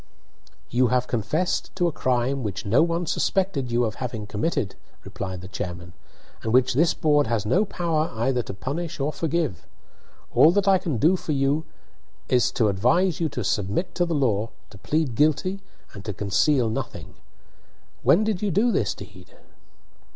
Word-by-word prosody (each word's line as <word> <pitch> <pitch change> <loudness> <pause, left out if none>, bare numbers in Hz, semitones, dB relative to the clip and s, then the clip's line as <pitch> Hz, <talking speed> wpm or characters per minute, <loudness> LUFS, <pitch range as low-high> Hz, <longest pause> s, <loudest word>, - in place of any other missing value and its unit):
"You 125 +1 +3
have 125 +1 +1
confessed 125 - -1
to 180 -2 +1
a - - 0
crime 130 0 0
which 105 -2 -4
no 115 +9 +4
one 170 +1 0
suspected 170 -10 0
you 120 +1 +2
of 110 +2 -5
having 115 -4 -4
committed," 105 0 -2 0.3
replied 95 -2 -6
the 95 - -9
chairman, 90 -3 -6 0.5
"and 110 - -2
which 130 +1 +4
this 160 +6 +3
board 150 -4 +2
has 110 -3 -1
no 180 - +3
power 165 -5 -1
either 125 +2 +1
to 110 - -7
punish 150 - -4
or 145 +2 -1
forgive. 160 - -2 0.7
All 160 - +7
that 200 0 +1
I 190 -1 +5
can 160 -8 -2
do 160 - +4
for 160 -4 -3
you 140 +3 +1 0.6
it 125 - +3 0.2
to 115 - +3
advise 135 - +2
you 165 -2 0
to 125 - -4
submit 100 - -1
to 175 - +1
the 170 - -1
law, 115 -6 +1 0.2
to 100 - -13
plead 150 - 0
guilty, 155 - +1 0.3
and 100 - -9
to 105 - -3
conceal 115 +7 +2
nothing. - - -5 0.9
When 205 - +4
did 215 -4 -1
you 210 - 0
do 210 +7 +2
this 100 - 0
deed?" 95 -3 -13
135 Hz, 175 wpm, -24 LUFS, 110-165 Hz, 0.9 s, All